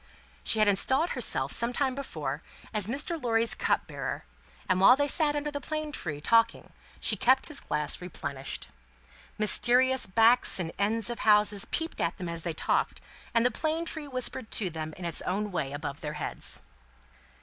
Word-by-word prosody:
She - - +2
had 215 -1 +4
installed 265 - +3
herself, - - +1
some 235 +1 +4
time 265 0 0
before, 155 - -5 0.3
as 210 -3 -1
Mr. 295 +7 -3
Lorry's 230 -1 +2
cup - - 0
bearer; - - -5 0.4
and 185 0 +1
while 250 +6 +8
they 285 +1 0
sat 295 +1 +1
under 295 0 -2
the 285 0 -5
plane 310 0 -4
tree, 155 - -4
talking, 230 +8 +2 0.3
she - - +1
kept 260 +5 +3
his 300 - -2
glass 150 +3 -3
replenished. 145 -6 -6 0.7
Mysterious 250 +4 +3
backs 225 +3 +4
and 165 -2 -3
ends 225 +3 0
of 240 - -6
houses 210 -1 +4
peeped 325 +1 -3
at 170 0 -1
them 180 -2 -5
as 170 0 -5
they 170 0 -3
talked, - - -1 0.4
and 230 +1 +4
the 250 - +4
plane 315 +7 -2
tree 315 -3 -6
whispered 255 -2 -2
to 190 -5 +1
them 155 -1 -6
in 180 - -7
its 170 - +2
own 205 +3 -2
way 145 -7 -2
above 145 0 -6
their 150 -2 -4
heads. - - -3
225 Hz, 180 wpm, -28 LUFS, 175-265 Hz, 0.7 s, while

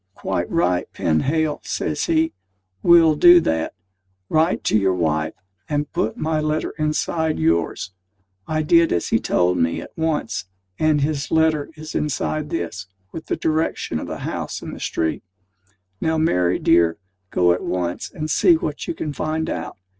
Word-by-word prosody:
"Quite - - -2
right, 90 0 0
Penhale!" 150 - 0
says 150 - -2
he; 160 -1 +1 0.5
"we'll 170 -2 +6
do 175 +3 +8
that. 80 - -1 0.6
Write 160 +3 +2
to - - +1
your 95 -3 +3
wife, 80 -2 0 0.3
and 145 -1 -2
put 110 - -1
my 155 0 0
letter 155 0 -1
inside 155 +1 0
yours." 80 +3 0 0.6
I 155 0 0
did 165 +2 +4
as 85 - 0
he - - +3
told 90 0 +1
me, 85 0 +1
at - - -11
once; 150 - -1 0.3
and 155 -2 +3
his 145 0 -1
letter 160 -2 +2
is 155 0 -8
inside 150 +1 -2
this, 100 - -4 0.2
with 160 - -8
the - - 0
direction 160 0 -1
of - - -6
the - - -6
house - - -4
and - - -6
the - - -10
street. 80 -1 -2 0.8
Now, 160 0 +1
Mary, 90 - +2
dear, 85 0 +3 0.3
go 90 -2 +3
at 90 - -3
once, 90 -1 -3
and 155 - -5
see 340 - +4
what 335 +2 -4
you 340 - -3
can 150 - -4
find 155 +2 -2
out. - - -5
150 Hz, 160 wpm, -21 LUFS, -, 0.8 s, do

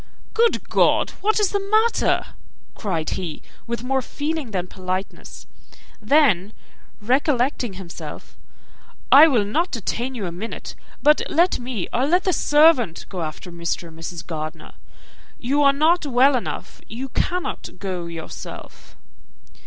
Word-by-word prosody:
"Good 460 +1 +2
God! - - +3
what 435 +2 +2
is 415 -3 +2
the 405 - +1
matter?" 435 +4 +1 0.4
cried 170 -7 -3
he, 170 -5 -5 0.2
with 235 +1 -3
more 265 +1 0
feeling 290 +1 -4
than 185 -4 -2
politeness; 185 +1 -6 0.6
then 215 - +3 0.5
recollecting 250 0 +1
himself, 185 -2 -9 0.8
"I 295 +4 +10
will 240 -9 +2
not 325 - 0
detain 240 +3 -3
you 215 -5 -4
a 175 - -4
minute; 195 +7 -6 0.3
but 300 +1 +5
let 345 +4 +2
me, 240 -7 -4
or 255 +4 +1
let 360 +4 +3
the 370 - +1
servant, 295 - +4
go 185 -3 -5
after 160 +3 -6
Mr. 170 0 -3
and 160 0 -14
Mrs. 165 +1 -6
Gardiner. 155 -2 -6 0.6
You 275 +4 0
are 280 -1 +6
not 315 +5 +3
well 265 +1 +4
enough; 245 - -5
you 255 +5 -6
cannot 360 +7 -2
go 180 -3 -4
yourself." 165 -1 -9
245 Hz, 135 wpm, -22 LUFS, 185-300 Hz, 0.8 s, I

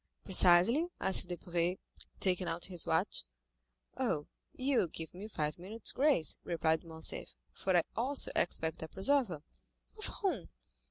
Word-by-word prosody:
"Precisely?" 190 - +5
asked 190 -1 +2
Debray, 175 0 -1 0.4
taking 185 -1 +1
out 170 +1 -2
his 180 -3 -5
watch. - - 0 0.7
"Oh, 225 - -1 0.3
you 260 0 +1
will - - +2
give 160 0 -8
me 195 +4 -7
five 150 -6 -3
minutes' 205 +5 -3
grace," 270 - +2
replied 160 -1 0
Morcerf, 160 -1 -4 0.2
"for 190 -2 +1
I 170 - +4
also 260 +4 +4
expect 160 -2 0
a 160 - -4
preserver." 190 - +1 0.6
"Of 430 - -3
whom?" 345 - -2
180 Hz, 140 wpm, -33 LUFS, 165-235 Hz, 0.7 s, Precisely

